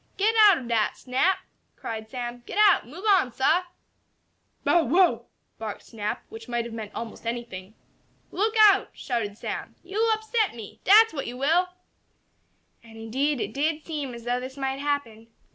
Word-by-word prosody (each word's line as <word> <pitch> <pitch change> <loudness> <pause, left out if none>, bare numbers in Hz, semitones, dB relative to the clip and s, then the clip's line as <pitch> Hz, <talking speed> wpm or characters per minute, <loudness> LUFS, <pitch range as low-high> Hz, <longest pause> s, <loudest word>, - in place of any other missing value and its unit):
"Get 430 +3 +2 0.2
out 380 - +5
ob 250 - -7
dat, 225 -3 0
Snap!" 265 +9 +1 0.4
cried 220 -1 -6
Sam. 245 0 -5
"Get - - -6
out! 410 - +5
Move 325 +10 -10
on, 375 -11 +4
sah!" 320 +9 +2 1.0
"Bow 345 -1 +4
wow!" 350 +8 +3 0.3
barked 220 -2 -6
Snap, 210 -2 -5
which 225 0 -10
might 240 -1 -1
have 235 - -8
meant 220 -2 -6
almost 230 0 -7
anything. 220 -4 -6 0.6
"Look 430 +4 0
out!" 400 -2 +5
shouted 225 -5 -3
Sam. - - -6
"Yo'll 420 +5 0
upset 440 - 0
me! 220 -4 -10
Dat's 440 +2 +7
what 275 - -4
you 245 - -6
will!" 325 +7 +2 1.1
And 225 -1 -15
indeed 265 +6 -1
it - - -3
did 305 +2 -1
seem 290 -6 -4
as 235 - -10
though 245 +1 -1
this 260 +2 -8
might 270 0 -2
happen. 280 -6 -3
260 Hz, 165 wpm, -26 LUFS, 230-355 Hz, 1.1 s, Dat's